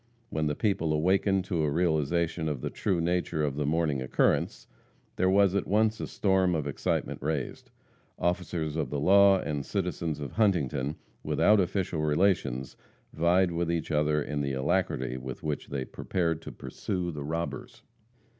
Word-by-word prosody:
When 80 -1 0
the 75 - -1
people 95 -6 0
awakened 95 +4 +2
to 85 -4 -1
a 75 - +1
realization 80 0 0
of 70 -4 -3
the - - -3
true 95 -4 -1
nature 85 -2 0
of 70 -2 -1
the 75 -1 -1
morning 75 -3 +1
occurrence, 65 - +1 0.5
there 95 - +2
was 100 -1 +4
at 100 - 0
once 110 +2 +2
a - - -3
storm 95 -3 +2
of 75 -3 -1
excitement 70 - -2
raised. 75 -2 -3 0.5
Officers 85 -3 -1
of 80 -2 -1
the 70 - -2
law 100 +4 +6
and 75 -6 -3
citizens 85 -4 -2
of 70 -2 -5
Huntington, 75 - +1 0.3
without 105 0 +3
official 90 -3 -1
relations, 75 -5 +1 0.4
vied 85 +3 +3
with 85 0 -1
each 85 -1 -2
other 75 0 +2
in 75 -1 -3
the 70 -1 -1
alacrity 65 -1 0
with 65 0 -7
which 75 -2 -3
they 65 -2 -3
prepared 85 0 -2
to - - -8
pursue 90 -2 -4
the 75 -2 -6
robbers. 80 +3 -5
80 Hz, 165 wpm, -28 LUFS, 75-95 Hz, 0.5 s, law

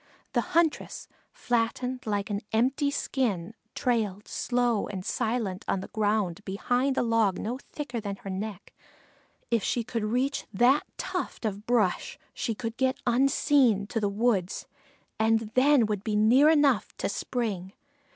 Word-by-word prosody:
The - - +3 0.2
huntress, 335 -3 +1 0.2
flattened 245 +1 -1
like 205 0 -1
an 200 0 -1
empty 260 +6 +2
skin, 225 -10 -1 0.2
trailed 215 -5 -1
slow 245 -3 0
and 190 -2 -6
silent 225 -5 -1
on 190 - 0
the - - -8
ground 210 -5 0
behind 245 +7 0
a - - +3
log 225 -5 +2
no 240 +4 -3
thicker 265 -5 -6
than 200 -2 -4
her 195 - -9
neck; 200 +1 -6 0.8
if 230 -3 +2
she 240 - 0
could 230 -1 -3
reach 250 +6 -1
that 245 +8 +3
tuft - - -4
of 210 0 -3
brush 225 -7 +1 0.2
she 230 - -2
could 230 +2 -5
get 260 0 +1
unseen 255 -3 +3
to 225 - -1
the 205 -2 0
weeds 200 -3 0 0.5
and 220 0 +2
then 265 -1 +5
would 210 -2 -2
be 215 -2 -1
near 240 +8 +6
enough 285 -9 +3
to - - -1
spring. 200 -3 -3
225 Hz, 150 wpm, -28 LUFS, 205-250 Hz, 0.8 s, near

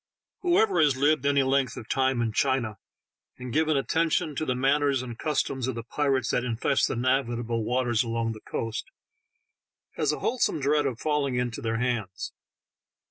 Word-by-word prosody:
HOEVER 385 +3 +3
has 145 -4 +3
lived 145 0 +2
any 140 -1 +3
length 130 -3 +1
of 110 - -8
time 130 -2 +1
in 115 - -1
China, 120 -5 0 0.6
and 125 -2 -7
given 155 0 +2
attention 160 +1 0
to 155 - -2
the 130 - +1
manners 135 0 +2
and 120 -2 -7
eustoms 135 -4 -1
of 130 - -2
the 115 - -5
pirates 135 0 0
that 125 - +1
infest 125 +3 +1
the - - -2
navigable 120 -2 0
waters 120 -1 +1
along 115 -1 -1
the 110 -1 -8
eoast, 115 0 -3 1.1
has - - +2
a - - -2
whole 255 - -2
some - - +1
dread 145 +1 +2
of 120 -4 -4
falling 150 -4 0
into 125 -2 -2
their 115 0 -1
hands. 115 -6 -2
130 Hz, 175 wpm, -27 LUFS, 120-145 Hz, 1.1 s, HOEVER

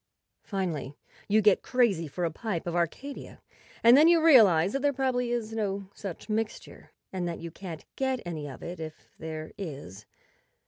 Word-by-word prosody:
Finally 165 -9 -3 0.3
you 215 +1 +3
get 210 -2 +5
crazy 215 -10 +1
for 175 +5 -3
a 165 - -1
pipe 190 0 -4
of 175 -1 -3
Arcadia, 175 - -3 0.4
and 235 +2 +8
then 300 +4 +7
you 340 0 +6
realize 210 - +6
that 275 - -1
there 285 +1 +3
probably 255 -2 0
is 230 -2 -2
no 200 -3 -2
such 195 -2 -7
mixture, 220 0 -4 0.2
and 180 -2 -2
that 170 - -3
you 170 0 -7
can't 170 -2 -8
get 265 -1 0
any 155 -4 -5
of 135 - -10
it 175 +1 -6
if 155 -1 -9
there 155 -1 -6
is. 135 - -7
195 Hz, 175 wpm, -28 LUFS, 165-240 Hz, 0.4 s, and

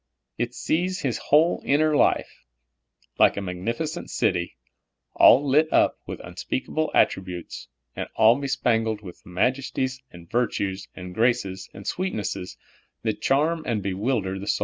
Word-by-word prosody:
It 120 0 -2
sees 180 +4 -1
His 125 -5 -1
whole 160 +4 +3
inner 150 +2 +2
life, - - +1 0.8
like - - +5
a - - -1
magnificent 115 - -3
cit}^, 90 -7 0 0.6
all 140 +4 +6
lit 155 +4 +3
up - - +3
with - - -6
unspeakable 155 +4 -3
attributes, 90 -2 0 0.3
and - - -4
all 115 +5 +5
bespangled 115 -5 0
wdtli 90 -5 -12
majesties 130 +6 -1
and 85 -1 -14
virtues 100 -5 -1
and 90 0 -8
graces 100 -4 0
and 100 - -11
sweetnesses, 105 - -3 0.5
that - - -2
charm 155 +5 +2
and 110 -5 -1
bewilder 100 0 -1
the 100 - -7
115 Hz, 130 wpm, -25 LUFS, 95-140 Hz, 0.8 s, all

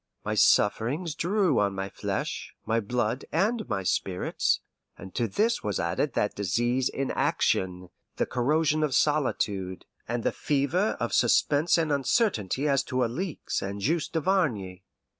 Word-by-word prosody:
My - - -1
sufferings 140 - +2
drew 180 - +1
on 100 -1 +1
my 95 0 -3
flesh, - - -4
my 115 +1 +1
blood, 120 +2 -1
and 215 - 0
my 95 -2 -1
spirits, 90 0 0 0.4
and 95 -1 -10
to 120 - 0
this 220 - +1
was 105 -2 -1
added 115 - -1
that 105 - +1
disease 120 +7 0
inaction, 90 -8 0 0.3
the - - 0
corrosion 150 +5 +1
of 150 -4 +1
solitude, 105 -12 0 0.2
and 120 0 -2
the - - +1
fever 150 +9 0
of 120 - -2
suspense 145 +7 +3
and 160 -2 0
uncertainty 140 - +1
as 140 -1 +3
to 130 -1 0
Alixe 150 +9 -3
and 100 +1 -4
Juste 155 - -1
Duvarney. 140 - 0
125 Hz, 140 wpm, -27 LUFS, 105-155 Hz, 0.4 s, suspense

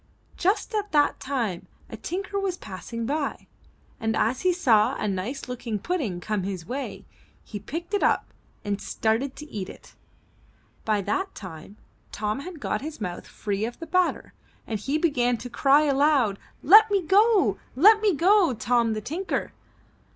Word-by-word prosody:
Just 395 +6 0
at 415 -1 -2
that 295 -1 +3
time 235 -10 -3 0.2
a - - -8
tinker 395 +3 -4
was 380 -2 -2
passing 225 - -6
by, 285 +3 -2 0.5
and 225 0 -1
as 240 +4 +1
he 370 - +3
saw 235 - +3
a - - -2
nice 205 +9 -3
looking 245 -3 -4
pudding 235 - -2
coming 200 0 -2
his 185 -4 -5
way, 270 +8 -5 0.4
he 205 - -7
picked 340 - -6
it 410 - +1
up - - +1 0.3
and 200 -1 -2
started 225 +6 -1
to 300 - -9
eat 195 -3 -5
it. - - -13 0.9
By 215 -2 +1
that 385 - -2
time, 185 +1 -10 0.3
Tom 210 +3 -2
had 340 +2 -8
got - - -2
his 305 +2 -7
mouth 180 -5 -5
free 205 -1 -3
of 235 +2 -4
the 330 - -7
batter 365 +1 0 0.3
and 220 -2 -3
he 275 +8 -1
began 250 -7 +1
to 240 +2 -8
cry 280 +4 +4
aloud: 275 -7 +2 0.3
^Tet 430 +6 +8
me 400 -2 +1
go! 410 +4 +4 0.2
Let 420 - +6
me 415 -5 +3
go, 360 - +4
Tom 230 0 +1
the 215 - -3
Tinker!'' 340 - -3
265 Hz, 165 wpm, -25 LUFS, 215-355 Hz, 0.9 s, ^Tet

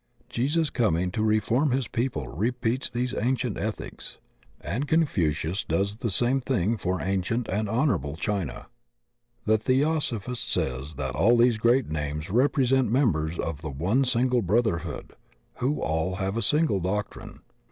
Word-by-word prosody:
Jesus 145 +5 0
coming 90 -7 +1
to 110 - -2
reform 110 +6 +2
his 130 0 0
people 115 - -2
repeats 120 - -1
these 125 +1 -2
ancient 125 -1 0
ethics, 105 +1 -5 0.4
and 130 +8 -3
Confucius 90 - +1
does 100 +1 -1
the 115 - -2
same 125 +7 +2
thing 115 -4 0
for 90 -3 -2
ancient 95 +5 -1
and 105 +2 -1
honorable 115 - 0
China. 90 -5 -3 0.8
The 110 0 +3
Theosophist 130 -2 0
says 65 +4 -2
that 65 -3 -3
all 100 - +4
these 120 -2 +4
great 120 +1 +3
names 75 +2 -3
rep 130 +8 +2
resent 130 -2 +3
members 85 - +1
of 80 -3 -3
the 75 - -5
one 90 - +1
single 125 0 +2
brotherhood, 105 -2 -1 0.4
who 135 +4 0
all 80 +4 -1
have 95 +1 -2
a 115 - 0
single 150 -7 +2
doctrine. 105 +4 -4
110 Hz, 145 wpm, -26 LUFS, 90-125 Hz, 0.8 s, all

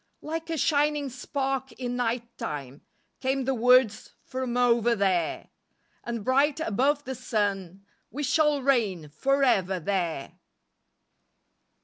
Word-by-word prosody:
Like 325 +2 -4
a 325 - -1
shining 295 -1 +1
spark 265 +1 -3
in 245 -1 -4
night 235 -1 -2
time 140 - -6 0.4
Came 265 0 -1
the 270 - +1
words 250 -2 +3
from 255 -1 -3
over 240 -1 +3
there, 185 -5 0 0.5
"And 235 -3 -5
bright 275 +4 +2
above 280 +3 +1
the 265 - -3
sun," 200 -6 -2 0.2
"We 290 +6 -5
shall 300 -1 +2
reign 210 - +1
forever 195 - +1
there." 170 -5 -3
245 Hz, 115 wpm, -27 LUFS, 200-275 Hz, 0.5 s, words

